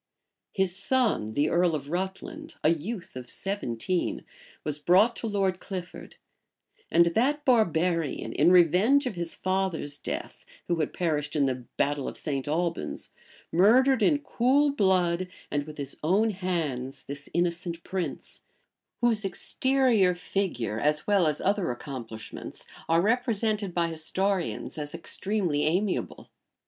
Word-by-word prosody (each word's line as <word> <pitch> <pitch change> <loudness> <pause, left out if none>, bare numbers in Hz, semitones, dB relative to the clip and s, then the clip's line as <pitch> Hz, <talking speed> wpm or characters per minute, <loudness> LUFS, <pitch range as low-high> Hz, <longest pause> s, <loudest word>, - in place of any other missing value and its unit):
His 190 -2 0
son, 215 - +1
the 145 +1 +2
earl 170 -1 +3
of 145 0 -6
Rutland, 305 - -4
a 155 - +5
youth 170 - -3
of 125 -1 -7
seventeen, 185 - -2 0.4
was 150 -1 -3
brought 190 +9 +4
to 230 - -3
Lord 195 -3 0
Clifford; 180 -2 -7 0.7
and 170 - +5
that 265 - +1
barbarian, 170 - +1
in 155 +5 +4
revenge 185 - +5
of 250 - -2
his 170 -2 -4
father's 185 -6 -1
death, - - -5 0.2
who 170 -1 0
had 155 - 0
perished 150 -4 -1
in 145 -2 +3
the 130 -2 -2
battle 145 -1 0
of - - -5
St. 140 -4 -3
Albans, 170 +3 -2 0.4
murdered 240 +8 +5
in 290 +8 +4
cool 275 +5 +3
blood, 185 -6 +2 0.2
and 145 0 -1
with 150 - -9
his 140 -1 -3
own 200 +8 +3
hands, 150 -9 -3
this 140 0 -8
innocent 170 -1 -1
prince, 185 -2 -4 0.6
whose 230 -3 +2
exterior 235 -2 +2
figure, 165 - -2
as 150 +3 +1
well 200 -5 +3
as 150 -1 0
other 200 -1 +1
accomplishments, 120 -4 -7 0.2
are 165 +1 +4
represented 215 -3 0
by 170 -1 +1
historians 180 +2 -1
as 145 +1 -3
extremely 180 -2 -1
amiable. 180 +6 -1
180 Hz, 135 wpm, -27 LUFS, 150-205 Hz, 0.7 s, a